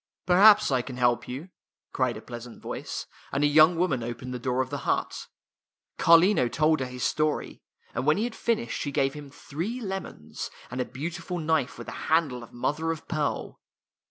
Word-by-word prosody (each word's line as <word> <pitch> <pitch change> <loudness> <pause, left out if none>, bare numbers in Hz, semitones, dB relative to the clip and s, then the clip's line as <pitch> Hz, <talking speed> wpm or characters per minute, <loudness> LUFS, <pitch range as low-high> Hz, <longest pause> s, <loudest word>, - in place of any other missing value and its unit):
Perhaps 205 +1 +7
I 130 -2 +2
can 125 0 -8
help 120 -1 +2
you," 140 +9 -6 0.4
cried 130 -4 0
a 110 - -10
pleas 120 -1 -8
ant 120 - -13
voice, - - -5 0.3
and 140 - 0
a - - +6
young 155 +4 +6
woman 165 -7 +1
opened 120 +2 -5
the 125 - -4
door 125 +1 -1
of 130 0 -4
the 145 - -3
hut. - - -2 0.7
Carlino 170 -3 +6
told 155 +5 +2
her 130 - -2
his 125 -1 -6
story, 155 +9 -1 0.3
and 125 +4 -2
when 155 - +5
he 210 - 0
had 240 -1 -2
finished 235 0 -1
she 145 - -2
gave 135 0 +1
him 150 -1 -9
three 170 - -5
lemons, 190 - -6 0.2
and 130 +1 -2
a - - -1
beautiful 170 +5 -5
knife 160 -5 0
with - - -9
a - - -6
handle 155 -6 +2
of 115 - -12
mother 150 +6 -1
of 160 -1 -6
pearl. 155 -3 -2
145 Hz, 195 wpm, -27 LUFS, 125-170 Hz, 0.7 s, Perhaps